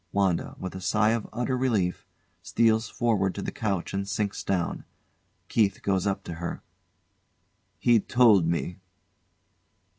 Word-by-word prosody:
WANDA, 95 -4 0
with 95 - -6
a 95 - -7
sigh 105 +3 +2
of 115 -2 -2
utter 125 +2 -1
relief, 110 -9 0 0.3
steals 110 -1 +2
forward 105 -6 0
to 100 - -4
the - - -3
couch 100 -5 -2
and 100 0 -2
sinks 100 +1 -2
down. 90 -3 -1 0.6
KEITH 105 -4 +1
goes 95 -1 +1
up 100 - -1
to 85 - -6
her. 85 - -4 1.1
He'd 120 -3 +2
told 110 -9 +5
me. 85 +2 -2
100 Hz, 140 wpm, -27 LUFS, 95-115 Hz, 1.1 s, told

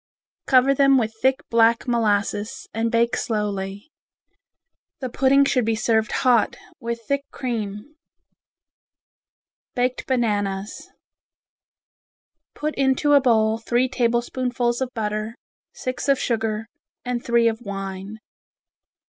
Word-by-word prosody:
Cover 260 +1 +5
them 275 0 +4
with 225 -3 0
thick 265 +2 +2
black 230 +1 +3
molasses 210 -3 0
and 225 +1 -1
bake 235 0 +2
slowly. 205 +2 -3 1.1
The 255 - -4
pudding 275 +3 +4
should 255 -2 +2
be 225 0 0
served 220 -1 +1
hot, 240 -4 +3 0.2
with 235 0 -4
thick 280 +5 -1
cream. 220 0 -5 1.8
Baked 250 0 -1
Bananas 205 -5 -1 1.7
Put 305 +1 -2
into 275 +2 +2
a 285 - +6
bowl 220 -3 +2
three 240 +2 +1
tablespoonfuls 240 0 -1
of 260 - -1
butter, 215 0 -3 0.4
six 255 +2 -4
of 275 - +5
sugar, 220 -3 -1 0.4
and 245 -1 -2
three 235 -1 +3
of 225 +1 -1
wine. 195 0 -6
235 Hz, 110 wpm, -23 LUFS, 215-255 Hz, 1.8 s, a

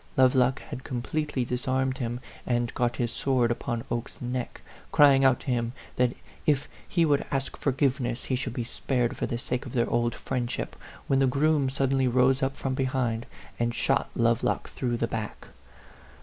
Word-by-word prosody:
Lovelock 130 0 +4
had 130 - -8
completely 135 +1 -2
dis 125 +2 -2
armed 130 0 +1
him, 120 0 -3 0.3
and 120 -1 0
got 120 0 0
his 120 -2 -1
sword 125 -3 +1
upon 120 0 -2
Oke's 120 +1 -3
neck, 125 0 -4 0.3
crying 140 -2 +6
out 130 -2 +4
to - - -13
him 120 -1 0 0.2
that 125 -1 +2 0.3
if 145 -2 +2 0.2
he 170 -2 +3
would 145 -2 +3
ask 135 -1 -2
forgiveness 130 -3 0
he 130 - -1
should 125 -1 -3
be 120 - -1
spared 120 +1 -1
for - - -2
the 120 - -2
sake 125 +1 -3
of - - -8
their 120 -3 +2
old 120 0 +1
friendship, 125 -2 -3 0.3
when 135 - +2
the 135 - +4
groom 140 +1 +2
sud 135 0 0
denly 135 -2 +2
rode 130 +2 +4
up 135 +1 0
from 135 - -2
behind, 130 -3 -1 0.3
and 120 0 0
shot 135 - +1
Love 115 -1 +3
lock - - -1
through 120 -2 -1
the 115 - 0
back. 110 -2 -5
125 Hz, 185 wpm, -27 LUFS, 120-135 Hz, 0.3 s, crying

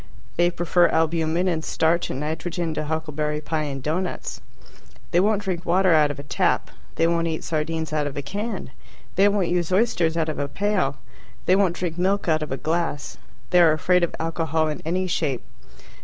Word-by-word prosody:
They 175 0 +3
prefer 175 0 +3
albumen 165 +2 +1
and 165 -3 0
starch 165 +2 +1
and 130 - -3
nitrogen 165 +2 -2
to 155 - -3
huckleberry 150 -1 -2
pie 155 0 -2
and 135 -2 -5
doughnuts. 175 +5 -3 0.7
They 175 - +4
won't 205 +1 +2
drink 180 -3 -2
water 185 0 +3
out 150 -2 +5
of 145 - -4
a 140 - -7
tap. 140 - 0 0.2
They 165 - +2
won't 170 0 +1
eat 160 -1 -3
sardines 160 0 -2
out 150 -1 +1
of 145 - -6
a 145 - -3
can. 200 - -4 0.4
They 195 +2 +5
won't 200 -4 +1
use 175 -1 0
oysters 180 -5 +2
out 160 -1 +1
of 155 - -3
a 145 - -1
pail. 185 -4 0 0.5
They 185 - +5
won't 190 -3 +2
drink 175 -2 -3
milk 195 +2 +1
out 160 -1 +2
of 155 - -4
a 135 - -1
glass. 160 -3 -2 0.3
They 180 -1 +6
are 165 -2 +6
afraid 180 +3 +2
of 170 - 0
alcohol 160 -1 0
in 150 - -4
any 180 +3 0
shape. 150 -8 -1
165 Hz, 195 wpm, -24 LUFS, 155-180 Hz, 0.7 s, They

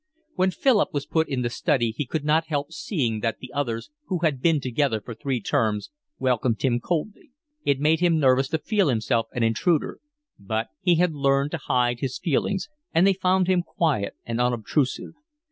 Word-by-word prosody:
When 185 +1 +2
Philip 210 - +2
was 145 - -1
put 160 -1 0
in 130 -3 -1
the 120 - 0
study 120 -5 +1
he 125 +4 -4
could 150 +2 -3
not 155 +2 +2
help 145 0 -2
seeing 130 - -2
that 115 +1 -1
the 130 - -11
others, 120 - -3 0.2
who 185 - -1
had 145 -6 +1
been 165 -1 +3
together 130 -2 0
for 115 +3 -8
three 125 +3 -2
terms, 110 -3 -1 0.3
welcomed 125 -3 +1
him 120 -3 +2
coldly. 195 - -3 0.4
It 140 -1 +2
made 155 +2 +3
him 170 -2 +3
nervous 135 -2 +3
to 160 - 0
feel 200 +2 +1
himself 115 -1 0
an 120 - -1
intruder; 140 +9 +1 0.4
but 110 +3 -3
he 180 -2 +4
had 175 0 +2
learned 140 0 +1
to 170 - -2
hide 120 -3 +1
his 130 -1 -3
feelings, 185 - -1 0.2
and 170 +3 +4
they 195 - +5
found 185 0 +2
him 185 -1 +2
quiet 150 -12 -1
and 115 +1 -2
unobtrusive. 125 +3 0
140 Hz, 190 wpm, -24 LUFS, 120-165 Hz, 0.4 s, they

